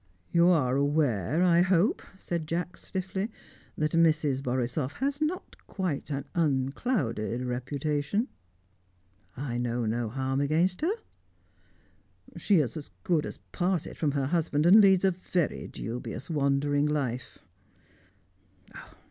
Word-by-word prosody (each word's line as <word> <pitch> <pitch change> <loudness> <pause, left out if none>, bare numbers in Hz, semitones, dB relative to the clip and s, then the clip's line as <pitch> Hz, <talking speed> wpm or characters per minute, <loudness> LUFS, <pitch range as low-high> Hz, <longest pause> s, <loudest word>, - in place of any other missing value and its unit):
"You 170 0 +5
are 140 -8 +3
aware, 140 - +1
I 175 -1 +5
hope," 185 +2 +3 0.2
said 170 -4 -4
Jacks 175 +2 -3
stiffly, 190 +2 -3 0.5
"that 155 0 0
Mrs. 155 -5 +3
Borisoff 130 +2 -1
has 280 +2 -2
not 330 +4 -2
quite 180 -9 -3
an 140 -2 -3
unclouded 135 - 0
reputation?" 145 - -1 1.1
"I 120 -3 -3
know 120 -1 -1
no 115 +1 -1
harm 135 +3 -1
against 165 +6 +1
her." 325 - +2 1.5
"She 195 -6 +3
is 135 - -3
as 150 - -8
good 165 -4 +1
as - - -7
parted 180 -2 -1
from 150 -3 0
her 140 -2 0
husband, 155 -1 +1
and 200 +5 +9
leads 195 -2 +5
a 190 - +4
very 175 -2 -2
dubious 125 +5 -6
wandering 145 0 +2
life." 135 -5 -3
150 Hz, 120 wpm, -28 LUFS, 130-180 Hz, 1.5 s, and